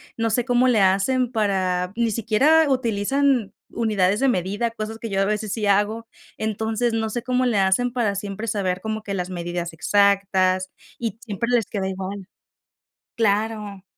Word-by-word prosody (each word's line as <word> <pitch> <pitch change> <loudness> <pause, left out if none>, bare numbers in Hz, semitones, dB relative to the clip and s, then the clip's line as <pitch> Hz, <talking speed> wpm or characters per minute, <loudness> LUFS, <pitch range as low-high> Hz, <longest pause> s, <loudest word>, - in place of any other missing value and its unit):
no 225 0 0
sé 235 +2 0
cómo 245 0 +3
le 235 -5 +3
hacen 215 +7 +2
para 185 -5 0
ni 230 -1 +1
siquiera 270 +9 +3
utilizan 255 -1 +1 0.2
unidades 210 -3 +1
de 275 - +2
medida, 205 +1 0
cosas 225 0 -6
que 230 - -5
yo 195 -1 -1
a 195 - +3
veces 210 0 -2
sí 215 0 -2
hago, 210 +3 +1 0.3
entonces, 220 +2 -1
no 225 -1 -1
sé 235 +2 -4
cómo 255 0 +1
le 230 -4 +1
hacen 195 +6 +2
para 235 -4 0
siempre 200 +2 -5
saber 190 -4 -1
como 220 +2 -4
que 200 -2 -4
las 180 0 -3
medidas 175 -1 -4
exactas 190 0 +2 0.3
y 225 -3 -3
siempre 230 +1 -3
les 240 -3 +2
queda 195 -1 -3
igual. 190 0 -6 0.9
Claro. 210 -2 -1
215 Hz, 165 wpm, -23 LUFS, 195-230 Hz, 0.9 s, cómo